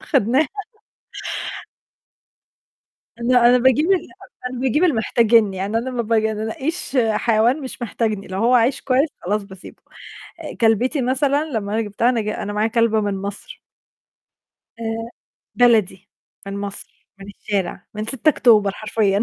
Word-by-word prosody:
خدناها. 260 +8 +2 2.7
لأ، 240 0 +3
أنا 250 - +5
باجيب 260 +5 +3
ال 370 - 0 0.4
أنا 250 -1 -6
باجيب 265 +5 +1
اللي 325 - +3
محتاجني، 220 -3 +3
يعني 200 +4 -1
أنا 260 +3 -4
ما 245 -2 -2
باجي 220 -1 +1
أنا 215 0 -4
أنقيّش 275 +7 -3 0.2
حيوان 225 +5 +2
مش 260 -2 -8
محتاجني، 215 -3 -2
لو 190 +1 -5
هو 235 +4 +3
عايش 250 +3 +3
كويس 275 +3 +2
خلاص 205 +3 -1
باسيبه. 190 -2 -13 0.8
كلبتي 240 +5 +2
مثلًا 275 +4 +1
لمّا 210 -5 -3
أنا 225 - +1
جبتها 215 +3 0
أنا 245 -3 +1
ج 215 - -4
أنا 205 -1 -4
معايا 210 +2 0
كلبة 230 -1 +2
من 205 -1 -1
مَصر. 200 +1 -7 1.2
آآ، 225 0 -4 0.5
بلدي، 210 -5 +2 0.4
من 200 0 -5
مصر، 200 0 -8
من 195 - -11
الشارع، 200 -2 -4
من 215 +1 -4
6 270 +5 0
أكتوبر 220 -8 +4
حرفيًا. 210 -1 0
225 Hz, 145 wpm, -20 LUFS, 205-250 Hz, 2.7 s, أنا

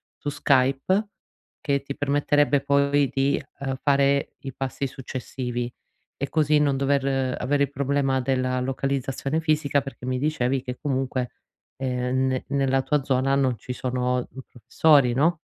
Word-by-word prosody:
su 145 - -4
Skype, 140 +9 +2 0.5
che 140 -2 0
ti 140 0 -6
permetterebbe 145 0 +2
poi 140 0 +2
di, 135 +1 +1 0.2
uhm, 135 -1 -2
fare 140 -1 +2
i 135 -2 -7
passi 135 +1 -3
successivi 125 -1 -5 0.5
e 140 - -4
così 150 -1 +3
non 140 -2 +2
dover 135 -1 +1
avere 140 +2 +1
il 140 - -1
problema 135 -1 0
della 130 0 0
localizzazione 135 +3 -2
fisica, 150 -3 +1
perché 135 -2 -9
mi 130 0 -1
dicevi 135 -3 0
che 125 -2 -5
comunque 130 -3 -2 0.5
ehm, 130 0 0
ne 130 -1 -1
nella 135 -1 +1
tua 145 +1 +1
zona 135 0 +1
non 130 -3 +1
ci 125 - -6
sono, 125 0 -1
uhm, 130 +1 -6
professori, 130 +2 +3
no? 160 +7 +2
135 Hz, 145 wpm, -24 LUFS, 130-140 Hz, 0.5 s, così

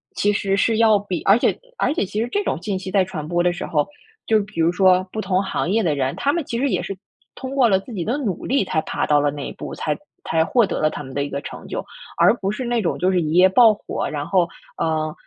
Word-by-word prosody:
其 205 - +2
实 195 -1 0
是 220 +3 +2
要 220 -2 +5
比 195 -3 -4
而 200 +2 +5
且 - - +1 0.2
而 270 - +1
且 310 - 0
其 210 +3 -3
实 235 - -1
这 410 - 0
种 165 - -2
信 200 -1 -2
息 185 - -6
在 195 0 +3
传 165 -5 -6
播 175 +1 +1
的 180 - +3
时 175 - -5
候， 150 -2 0 0.4
就 220 -1 +4
比 200 -3 -9
如 165 +1 +3
说 185 0 +4
不 220 - -5
同 190 -2 +1
行 180 - -2
业 220 +4 +2
的 155 -5 +1
人， 135 -1 -1
他 280 - +1
们 340 - -1
其 235 - -3
实 275 +2 +1
也 - - 0
是 195 - -5 0.4
通 265 +1 -6
过 260 -3 +5
了 190 -2 +3
自 195 - -12
己 185 -5 -3
的 245 +5 0
努 215 - -3
力 275 -2 +2
才 160 - 0
爬 - - -2
到 150 -1 +3
了 145 0 +1
那 145 -1 -6
一 - - -6
步， - - -7
才 - - -2 0.3
才 160 0 +3
获 235 +5 +3
得 - - -3
了 155 - +3
他 - - -6
们 135 -1 -10
的 140 - -1
一 145 - -4
个 140 - -4
成 - - -9
就， - - -4 0.3
而 - - +5
不 195 -4 -2
是 235 +5 -4
那 240 -1 0
种 175 - -1
就 185 +2 +2
是 180 -2 +2
一 155 -1 -2
夜 180 +2 +7
爆 225 +2 +6
火， 205 - -4
然 145 -1 -4
后， 180 -3 +2 0.3
呃， 155 -1 -1
190 Hz, 305 characters per minute, -21 LUFS, 165-220 Hz, 0.4 s, 夜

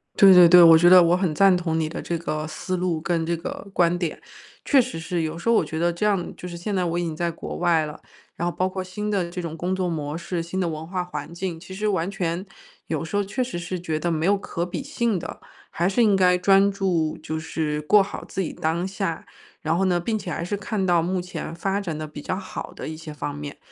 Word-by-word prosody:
对 195 -1 +8
对 180 -2 +9
对， 180 +1 +8
我 165 -1 +9
觉 175 +2 +5
得 185 -1 +10
我 175 +1 +4
很 185 -4 0
赞 195 +3 +5
同 165 -2 -1
你 155 -1 -1
的 165 - -6
这 170 - -3
个 155 -2 -3
思 185 +4 -4
路， 175 -3 -1
跟 165 0 0
这 170 +1 0
个 170 +4 -7
观 175 -1 +3
点。 175 -3 -3 0.4
确 280 - +4
实 250 -9 -1
是， 170 0 -2
有 160 0 -3
时 230 - -1
候 235 - +5
我 - - +3
觉 160 - -4
得 170 +1 +2
这 170 +5 -2
样 200 -4 0
就 180 - -8
是 175 - -7
现 200 +4 -3
在 185 -1 +1
我 170 0 -1
已 - - -1
经 165 -2 -3
在 170 +1 -1
国 165 - -7
外 170 -3 +2
了， 150 - -9 0.4
然 170 - -2
后 - - -8
包 185 +1 +1
括 185 0 -4
新 210 +3 -5
的 190 -4 0
这 180 - -4
种 165 -2 -6
工 180 +3 -1
作 185 -1 -1
模 150 -2 -3
式、 170 0 -3
新 170 +3 -4
的 180 -2 0
文 155 0 -6
化 180 0 -2
环 175 -1 -7
境， 170 -1 -4
其 190 +2 -11
实 210 +3 -2
完 185 -3 0
全 180 -2 -2 0.4
有 160 -2 -2
时 160 +4 -5
候 205 - +2
确 210 +6 -2
实 245 -7 -5
是 175 +1 -4
觉 160 -3 -2
得 170 +1 -1
没 160 +2 0
有 200 0 +4
可 170 -3 -4
比 180 +9 -5
性 235 -7 -1
的， - - -7 0.3
还 175 +2 0
是 235 +5 +2
应 210 -3 +4
该 180 -1 +4
专 195 +2 +4
注 180 -5 0
就 155 0 -4
是 155 -1 -2
过 205 +7 +5
好 195 - -7
自 - - -7
己 185 - -2
当 170 +4 -1
下。 190 -4 -3 0.4
然 160 +1 +1
后 190 - +2
呢， 180 -2 +2
并 215 +5 -1
且 190 - -7
还 170 - -3
是 200 +4 -2
看 205 -1 -2
到 175 -2 +3
目 180 +2 -1
前 180 -2 -6
发 195 +3 -1
展 170 -6 -4
得 155 - -4
比 150 -1 -9
较 185 - -2
好 190 0 -7
的 - - -7
一 155 - -6
些 160 -1 -8
方 145 -1 -4
面， 145 -1 -7
175 Hz, 290 characters per minute, -24 LUFS, 165-190 Hz, 0.4 s, 得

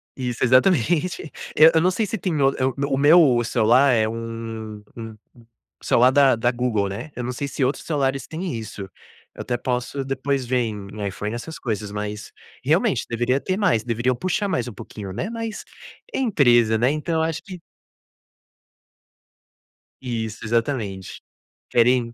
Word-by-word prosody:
Isso, 125 -2 -3
exatamente. 155 - +2 0.2
Eu 160 +2 +8
eu 160 - +5
não 185 +2 +3
sei 220 +4 0
se 220 +3 -3
tem 175 -3 -2
o 135 - +5
eh, 130 - +1
o 130 - 0
me 140 - -1
o - - +2 0.4
meu 120 - +1
celular 120 +4 +4
é 110 -2 +2
um 115 -1 -6
um 115 -2 -8 0.7
celular 125 +2 +4
da 140 -3 +5
da 120 +2 +1
Google, 120 -5 0
né, 120 +10 -7
eu 125 - -4
não 125 - -3
sei 140 +3 -4
se 140 - -2
outros 135 - -2
celulares 135 -3 -1
têm 170 +2 -4
isso, 110 -2 -7 0.5
eu - - -7
até 120 - -2
posso 125 +2 -2
depois 135 0 -1
ver 125 +1 0
em 105 -2 -5
iPhone 105 +3 -4
essas 160 +7 -7
coisas, 105 -3 -3
mas 105 +1 -5 0.3
realmente - - +2
deveria 120 +3 +1
ter 185 +4 -2
mais, 180 - +2
deveriam 120 +2 0
puxar 185 - -1
mais 125 -8 -1
um 120 - -7
pouquinho, 105 -3 -8
né, 205 - -3
mas 225 -2 -5 0.5
empresa, 120 - +3
né, 125 +3 +3
então 155 +2 -2
eu 160 - +2
acho 160 0 -2
que 185 -2 -9 2.4
Isso, 115 -3 -4
exatamente, 110 -5 -2 0.5
querem 120 0 +3
125 Hz, 165 wpm, -22 LUFS, 115-145 Hz, 2.4 s, Eu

